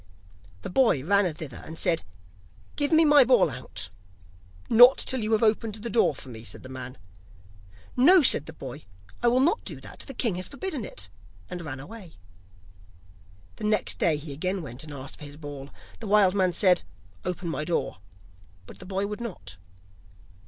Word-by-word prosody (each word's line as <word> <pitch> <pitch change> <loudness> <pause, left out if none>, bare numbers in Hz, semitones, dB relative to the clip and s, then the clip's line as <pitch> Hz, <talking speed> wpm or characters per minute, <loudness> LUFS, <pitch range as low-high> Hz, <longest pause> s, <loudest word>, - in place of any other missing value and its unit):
The - - -5
boy 225 - +3
ran 200 -1 +3
thither 155 -5 -8
and 160 - -9
said: 165 0 0 0.7
'Give 290 +1 0
me 320 0 +6
my 295 -2 +7
ball 245 - +4
out.' 95 -7 -6 0.8
'Not 245 +3 +8
till 260 -2 -1
you 215 +1 -2
have 220 - +2
opened 220 -1 +1
the 220 +1 -6
door 210 -9 +3
for 130 - -11
me,' 115 -2 -9
answered 115 - -7
the 130 - -10
man. 130 0 -8 1.0
'No,' 330 +7 +6
said 155 - +5
the 160 - -7
boy, 140 0 -9 0.4
'I 240 - +2
will 245 +2 +4
not 335 - +2
do - - -7
that; - - -11
the 270 - -8
king 225 -8 +1
has 185 - -3
forbidden 295 - -5
it,' 95 0 -6 0.4
and 180 - -5
ran 140 -4 -6
away. 185 +3 -11 1.4
The - - -9
next 210 -2 +1
day 160 -3 +2
he 145 -1 -7
again 185 +5 -2
went 125 0 -6
and 155 - -10
asked 135 -1 -8
for 150 - -8
his 145 0 -10
ball; 145 -2 -8 0.3
the 225 - -6
wild 200 -2 +5
man 190 -2 +2
said: 185 -2 +4 0.4
'Open 180 -1 -4
my 150 - -2
door,' 165 - -2 0.7
but - - -13
the 185 - -11
boy 195 +1 -1
would 210 +3 -5
not. 100 - -7
185 Hz, 185 wpm, -26 LUFS, 145-230 Hz, 1.4 s, Not